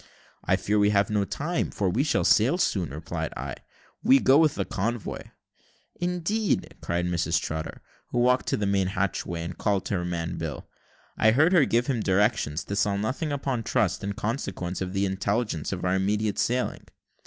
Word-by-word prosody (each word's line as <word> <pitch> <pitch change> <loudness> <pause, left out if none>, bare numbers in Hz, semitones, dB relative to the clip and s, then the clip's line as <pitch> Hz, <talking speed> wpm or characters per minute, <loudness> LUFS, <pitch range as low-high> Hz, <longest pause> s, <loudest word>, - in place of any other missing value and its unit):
"I - - +3
fear 105 +1 0
we 105 0 +4
have 100 0 +2
no 105 -1 +1
time, 165 - -2
we 100 +6 +2
sail 150 - +1
too 120 +10 +4
soon," 95 - 0
replied 80 +2 -4
I; - - -4 0.5
"we 135 - +6
go 135 +3 +5
with 155 -2 +3
the - - -1
convoy." 115 +3 -3 0.8
"Indeed!" 180 0 -1
cried 85 +1 -1
Mrs 85 -2 +1
Trotter, 80 0 -5 0.2
who - - -4
walked 125 +1 +3
to - - +1
the 105 - -1
main 100 -1 +1
hatchway 95 -3 -2
and 85 +1 -5
called 100 +2 0
to - - -3
her 90 -3 0
man 85 0 -3
Bill. 80 -3 -5 0.5
I 110 - +5
heard 150 +10 +4
her 165 -7 +6
give 120 0 +1
him 130 -4 0
directions 100 -5 +1
to 100 - -4
sell 100 0 +1
nothing 130 - -2
upon 135 -4 -1
trust 110 -5 0
in 100 0 -2
consequence 100 -6 -3
of 95 0 -3
the 100 0 +1
intelligence 100 -2 -1
of 95 -2 -3
our 90 - +2
immediate 105 +2 0
sailing. 125 +1 -1
100 Hz, 185 wpm, -26 LUFS, 90-125 Hz, 0.8 s, we